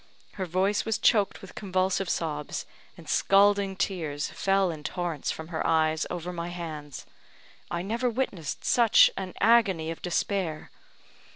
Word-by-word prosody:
Her 190 -2 -5
voice 190 +4 +1
was 225 -2 -1
choked 205 -4 +2
with - - -11
convulsive 185 -1 -1
sobs, 150 -3 -3 0.3
and - - -13
scalding 200 0 +3
tears 165 -7 -2
fell 195 -2 +1
in 155 -2 -8
torrents 170 -3 -3
from 160 +1 -5
her 160 - -2
eyes 160 0 +2
over 180 0 -5
my 170 0 -4
hands. 155 -5 -7 0.6
I 170 0 -3
never 235 +5 -1
witnessed 220 - -3
such 235 -3 +6
an 190 -2 -6
agony 195 -9 +3
of 165 - -8
despair. 180 -2 -2
180 Hz, 145 wpm, -27 LUFS, 160-200 Hz, 0.6 s, such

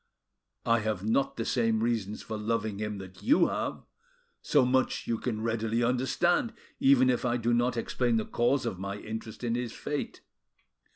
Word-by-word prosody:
I 115 0 +4
have 105 -3 -2
not 125 +5 +1
the 115 - -2
same 115 -2 +1
reasons 110 -3 -1
for 110 - -5
loving 110 -1 -2
him 105 -1 -3
that 95 -1 -10
you 290 +5 +4
have, - - -3 0.6
so 145 -4 +3
much 130 +1 +1
you 115 -1 -1
can 110 -4 -3
readily 115 +1 0
understand, 130 - +1 0.3
even 135 -1 +5
if 125 -1 +1
I 120 -1 +1
do 120 0 0
not 120 +1 +1
explain 120 0 0
the 110 - -1
cause 130 +3 +1
of 95 - -3
my 100 +1 -4
interest 110 +2 -7
in 115 -1 0
his 120 -1 -2
fate. 145 -1 -4
115 Hz, 175 wpm, -29 LUFS, 110-125 Hz, 0.6 s, even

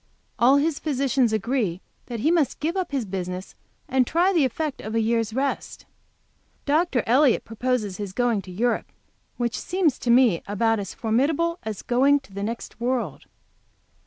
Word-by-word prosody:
All 250 +4 +6
his 300 +1 0
physicians 270 -5 +1
agree 220 -4 -1 0.3
that 235 -3 -5
he 310 - +3
must 330 -5 +1
give 325 +4 -1
up 375 -4 -2
his 270 -5 -1
business 185 -1 -5 0.3
and 260 -4 +2
try 355 +4 +2
the 320 -6 +4
effect 290 +3 -3
of 215 +1 -5
a - - +3
year's 225 -1 +1
rest. 270 +4 -3 0.8
Dr. 295 -4 +2
Elliott 255 +2 +3
proposes 225 -4 -2
his 205 -2 -5
going 235 0 +1
to 185 - -11
Europe, 235 +6 -1 0.5
which 240 -1 -1
seems 345 -7 0
to 240 - -3
me 235 -7 +5
about 225 +2 +1
as 195 - -6
formidable 290 +9 0
as 215 -3 -6
going 270 +4 +3
to 235 -8 -19
the 200 - -5
next 225 +1 -5
world. 240 - -2
245 Hz, 165 wpm, -24 LUFS, 220-280 Hz, 0.8 s, All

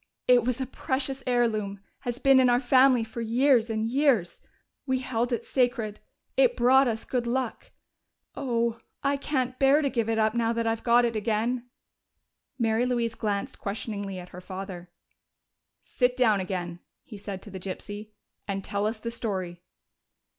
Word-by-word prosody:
"It 245 -2 +6
was 250 +1 -1
a 260 - -1
precious 265 +1 -3
heirloom 215 -5 0 0.2
has 245 -3 -3
been 270 0 +5
in 255 -1 +5
our 245 0 +4
family 255 -1 +5
for 225 +1 -6
years 235 +1 +3
and 220 0 -1
years. 250 - +1 0.5
We 260 0 +2
held 245 -1 -2
it 240 - -1
sacred; 240 -5 0 0.4
it - - +3
brought 265 +2 +5
us 225 -1 -2
good 245 -2 -2
luck. 250 -1 -2 0.6
Oh, 235 -4 -1 0.2
I 280 0 +2
can't 260 -3 -2
bear 280 +3 +5
to 280 - 0
give 230 -2 0
it 225 - +1
up 220 0 +2
now 230 -1 +1
that 230 0 -1
I've 225 0 -1
got 240 0 +5
it 230 -1 -1
again!" 230 +3 -1 0.9
Mary 230 0 +1
Louise 235 -2 0
glanced 205 -3 -3
questioningly 200 -1 -4
at 180 0 -9
her 180 - -10
father. 185 -1 -7 0.9
"Sit 250 -1 0
down 220 -5 +4
again," 175 -2 -4 0.2
he 210 -4 -10
said 195 -2 -6
to 210 - -11
the 190 - -6
gypsy, 205 +3 -7 0.4
"and 195 -1 -3
tell 205 +1 -1
us 220 0 -3
the 230 +1 -4
story." 190 -7 -4
230 Hz, 170 wpm, -27 LUFS, 210-255 Hz, 0.9 s, It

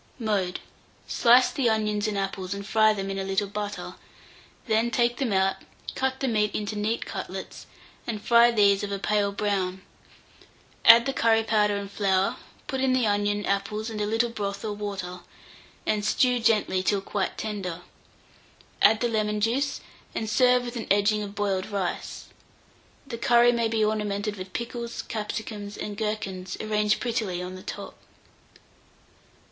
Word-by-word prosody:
Mode. 205 -6 -1 0.5
Slice 245 +1 +5
the 255 -4 +1
onions 210 -1 0
and 210 -1 -2
apples, 195 -1 -3
and 200 0 -7
fry 215 +1 +4
them 195 -2 -3
in 195 - -3
a - - -2
little 195 +2 0
butter; 205 +1 -5 0.7
then 225 +1 +2
take 240 0 +1
them 260 -5 -1
out, 190 0 +2 0.4
cut 265 0 -1
the 270 - +1
meat 210 -3 +1
into 210 0 -3
neat 215 +2 -1
cutlets, - - -7 0.4
and 220 -3 -3
fry 235 +2 +5
these 200 -4 +3
of 200 - -3
a 200 - -1
pale 205 0 +1
brown; 195 -2 -2 1.0
add 235 +1 +9
the 270 - -1
curry 225 -2 +3
powder 210 -2 +2
and 200 0 -6
flour, 195 +3 +1 0.3
put 265 -1 -3
in 265 -1 +2
the 255 -2 +2
onion, 205 0 0
apples, 210 +3 -2
and 215 -1 -4
a 205 - 0
little 225 +2 +1
broth 200 -2 -4
or 210 - -2
water, 195 -3 -5 0.7
and 210 -1 0
stew 250 +3 +2
gently 215 -4 +2
till 195 +1 +1
quite 195 0 -3
tender; 190 -5 -4 1.0
add 215 +1 +5
the 240 - +2
lemon 210 -2 0
juice, 255 +7 0 0.3
and 220 - -2
serve 250 +2 +4
with 240 +1 -6
an 225 - -5
edging 205 +2 +3
of 205 -1 -6
boiled 195 -2 -1
rice. 195 -4 -4 0.8
The 235 -4 -7
curry 240 0 +5
may 235 -1 +1
be 220 -1 +1
ornamented 210 -1 -1
with 185 -1 -8
pickles, 235 0 -4
capsicums, 210 -1 -5
and 210 - -5
gherkins 195 -4 -4
arranged 210 0 +1
prettily 225 -7 -2
on 180 +1 -5
the 185 - -9
top. - - -7
210 Hz, 165 wpm, -26 LUFS, 200-230 Hz, 1.0 s, add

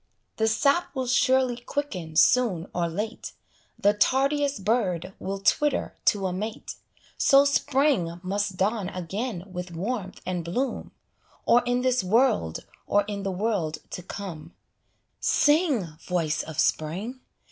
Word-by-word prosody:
The 220 - +2
sap 280 +10 +2
will 260 -1 -1
surely 255 0 +3
quicken 240 - -4
soon 200 -5 +4
or 175 -1 0
late, 210 +7 -5 0.4
The 205 - +3
tardiest 275 0 +1
bird 190 -6 0
will 195 +1 -3
twitter 290 +8 +1
to 200 -2 +3
a 185 - -1
mate; 215 +4 -5 0.5
So 275 +1 +6
Spring 270 - +1
must 195 0 -2
dawn 200 0 0
again 190 +3 -4
with 180 0 -5
warmth 190 +3 -4
and 180 -2 -2
bloom, 240 +10 -2 0.6
Or 240 - +5
in 245 0 +1
this 255 -4 +2
world, 215 - +2 0.2
or 205 0 +3
in 205 0 -5
the 195 - -2
world 185 -5 -1
to - - -5
come: 175 -4 -8 0.6
Sing, 295 - +3 0.2
voice 165 -4 0
of 160 -1 -8
Spring! 190 +15 -1
205 Hz, 135 wpm, -26 LUFS, 180-255 Hz, 0.6 s, So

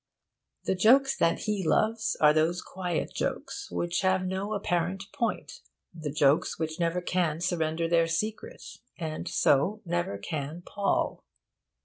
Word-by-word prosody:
The - - +1
jokes 260 +9 +5
that 165 - +1
he 210 -3 -1
loves 220 +6 +1
are 150 0 +6
those 160 +3 +1
quiet 180 -3 -3
jokes - - -3
which 175 0 -1
have 185 -1 +2
no 190 +3 -2
apparent 180 -1 -1
point 235 - -2 0.3
the 160 -4 -5
jokes 145 +1 +2
which 160 0 -3
never 170 +1 0
can 175 -3 0
surrender 165 -2 0
their 165 0 +3
secret, 215 - -3 0.3
and 160 -2 -4
so 190 +11 +2
can 175 - -9
never 175 -13 -1 0.5
pall. 200 -1 -1
175 Hz, 135 wpm, -28 LUFS, 165-195 Hz, 0.5 s, are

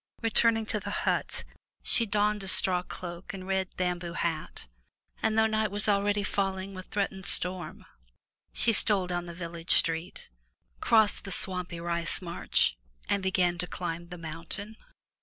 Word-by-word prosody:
Returning 225 0 +3
to 215 0 -1
the - - -6 0.2
hut, - - 0 0.4
she 230 - +2
donned 210 0 +1
a 195 - -5
straw 185 -1 +2
cloak 175 +1 -7
and 185 -1 -8
red 190 0 0
bamboo 180 -1 -2
hat, 160 - -3 0.5
and, 220 0 +1
though 220 - +5
night 215 -1 +1
was 205 +2 +5
already 205 0 +2
falling 195 -1 -2
with 185 0 -9
threatened 195 -2 -2
storm, 180 0 +2 0.7
she 230 - +2
stole 200 -3 +4
down 175 -1 -3
the 170 - -7
village 170 -1 0
street, 165 - -1 0.5
crossed 220 -2 +4
the 195 - -7
swampy 180 -2 -4
rice 170 0 -1
marsh, 170 - +1 0.4
and 200 - +2
began 180 -2 +1
to 180 - -2
climb 170 -1 -5
the 175 0 -8
mountain. 170 +6 -6
185 Hz, 155 wpm, -29 LUFS, 175-205 Hz, 0.7 s, though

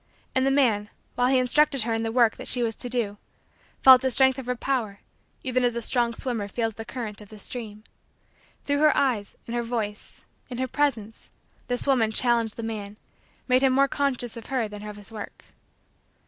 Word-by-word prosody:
And 260 +1 +2
the - - +4
man, 230 -7 +2 0.2
while 245 0 +1
he 260 0 +3
instructed 275 +1 +3
her 230 0 -1
in 225 - -1
the 225 0 -2
work 235 -2 +3
that - - -8
she 245 - +3
was 225 -2 -1
to 245 - -5
do, 225 -5 0 0.7
felt 260 -1 +9
the 265 - +1
strength 265 +1 +4
of 255 - -8
her 250 - 0
power 235 -6 -2 0.4
even 255 -1 0
as 240 -1 +1
a 235 - -2
strong 235 -1 +1
swimmer 230 -6 -2
feels 225 +2 -2
the 225 +1 -8
current 225 -4 -5
of 205 - -13
the 215 - -12
stream. 215 -1 -7 0.8
Through 285 0 0
her 305 0 +4
eyes, 235 -7 0
in 235 - -7
her 240 - 0
voice, 225 -3 -5 0.2
in 245 - -6
her 260 +1 -1
presence, 235 -6 -2 0.4
this 245 0 -1
woman 250 -6 +3
challenged 230 -1 +1
the 230 - -5
man, 210 -2 -5 0.5
made 255 0 +4
him 265 -1 +3
more 275 +1 +4
conscious 260 -4 -1
of 230 - -9
her 255 -5 -1
than 210 0 -9
of 210 0 -8
his 205 +1 -12
work. 215 -2 -9
240 Hz, 205 wpm, -25 LUFS, 220-260 Hz, 0.8 s, felt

